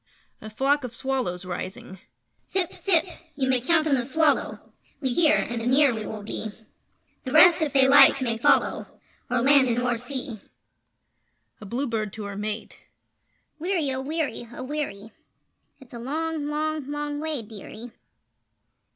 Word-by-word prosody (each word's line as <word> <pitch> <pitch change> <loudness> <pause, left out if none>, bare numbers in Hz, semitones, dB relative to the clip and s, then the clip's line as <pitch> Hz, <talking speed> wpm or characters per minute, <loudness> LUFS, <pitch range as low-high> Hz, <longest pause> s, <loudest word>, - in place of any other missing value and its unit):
[A 215 - -8
Flock 275 +6 +1
of 245 -2 -6
Swallows 250 -10 -3
Rising]: 185 +1 -7 0.5
Zip! 375 -3 -1
Zip! 360 -4 +2 0.3
You 270 -2 -1
may 255 -2 +2
count 315 +4 +2
on 305 - +1
the 260 - +2
Swallow! 295 +4 0 0.3
We 265 - -1
hear, 315 +3 +4
and 235 -1 -2
anear 260 +3 +4
we 220 -2 -5
will 215 -1 -7
be; 220 - -5 0.8
The 260 - -5
rest, 330 +3 +7
if 305 -2 0
they 270 -1 +5
like, 275 0 +7
may 230 -4 -2
follow - - +2 0.4
O'er 245 -1 +1
land 275 0 +5
and 235 -1 0
o'er 245 0 +1
sea. 245 -2 -5 1.2
[A 210 - -9
Bluebird 230 -3 -3
to 220 - -7
Her 200 0 -6
Mate]: 210 +2 -5 0.8
Weary! 335 -4 -1
Oh, 260 - -3
weary! 285 -5 -3
Oh, 240 - -7
weary! 255 -7 -5 0.7
It's 265 -3 -17
a 235 - -7
long, 310 +4 -3
long, 305 -1 -2
long 295 0 -3
way, 305 -5 -3
dearie! 220 +2 -10
265 Hz, 155 wpm, -25 LUFS, 230-295 Hz, 1.2 s, rest